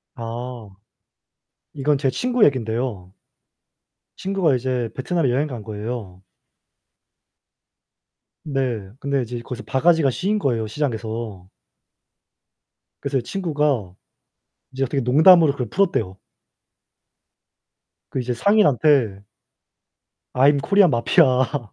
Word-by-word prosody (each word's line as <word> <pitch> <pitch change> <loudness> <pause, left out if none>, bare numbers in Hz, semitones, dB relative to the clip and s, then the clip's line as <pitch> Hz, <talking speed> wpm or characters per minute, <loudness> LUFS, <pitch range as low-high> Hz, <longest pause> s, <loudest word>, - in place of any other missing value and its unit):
아. 120 -1 -7 1.1
이건 145 +1 +1
제 135 -1 0
친구 245 - 0
얘긴데요. 115 -7 -2 1.0
친구가 190 -7 +1
이제 125 -2 -2
베트남에 135 +2 -1
여행 135 +5 0
간 120 -6 -7
거예요. 105 -3 -6 2.2
네. 130 -9 -3
근데 140 -1 -1
이제 120 0 -5
거기서 125 +1 -8
바가지가 160 +1 +2
씌인 200 - -1
거예요 120 - -1
시장에서. 110 -6 -4 1.5
그래서 140 -1 -1
친구가 145 - -2 0.8
이제 130 +1 -4
어떻게 135 +2 -2
농담으로 160 +5 +6
그걸 125 -5 -5
풀었대요. 170 - 0 2.0
그 - - -2
이제 125 0 -2
상인한테 140 - +3 1.1
"I'm 140 +2 +4
Korean 195 0 +4
mafia" 125 +1 +2
130 Hz, 240 characters per minute, -21 LUFS, 115-150 Hz, 2.2 s, 농담으로